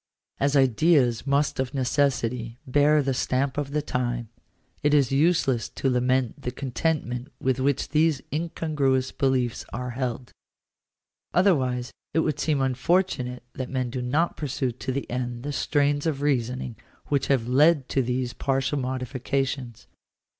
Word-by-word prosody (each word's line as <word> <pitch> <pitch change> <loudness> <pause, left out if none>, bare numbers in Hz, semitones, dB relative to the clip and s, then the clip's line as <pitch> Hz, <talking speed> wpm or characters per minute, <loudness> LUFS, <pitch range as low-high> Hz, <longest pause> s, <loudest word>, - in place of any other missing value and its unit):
As 140 +1 +2
ideas 135 -1 +3
most 140 0 +1
of 130 +1 -2
necessity 125 -3 0
bear 145 +3 +4
the 135 0 0
stamp 130 +1 0
of 145 -1 -2
the 150 +1 -1
time, 120 -4 -2 0.5
it 150 0 +3
is 140 -4 +3
useless 135 -5 +2
to 135 - -1
lament 125 -1 +1
the - - -2
contentment 130 0 -2
with 130 0 0
which 140 +1 0
these 155 -1 +3
incongruous 150 -5 0
beliefs 130 -3 0
are 125 -1 -4
held. 125 -1 -4 1.0
Otherwise 130 -10 +2 0.2
it 160 - +4
would 150 -2 -1
seem 150 -3 +1
unfortunate 130 -1 0
that 130 -1 -5
men 130 -2 -2
do 125 0 -3
not 145 +8 +1
pursue 135 -3 -2
to 130 +2 -5
the 140 +2 -3
end 120 -1 -4
the 145 0 -3
trains 145 +1 +1
of 145 -3 -1
reasoning 125 -4 -1 0.3
which 140 -2 +1
have 130 -4 +1
led 145 +2 +4
to 135 - +2
these 125 0 -1
partial 135 +1 0
modifications. 130 -1 -3
130 Hz, 145 wpm, -25 LUFS, 125-145 Hz, 1.0 s, bear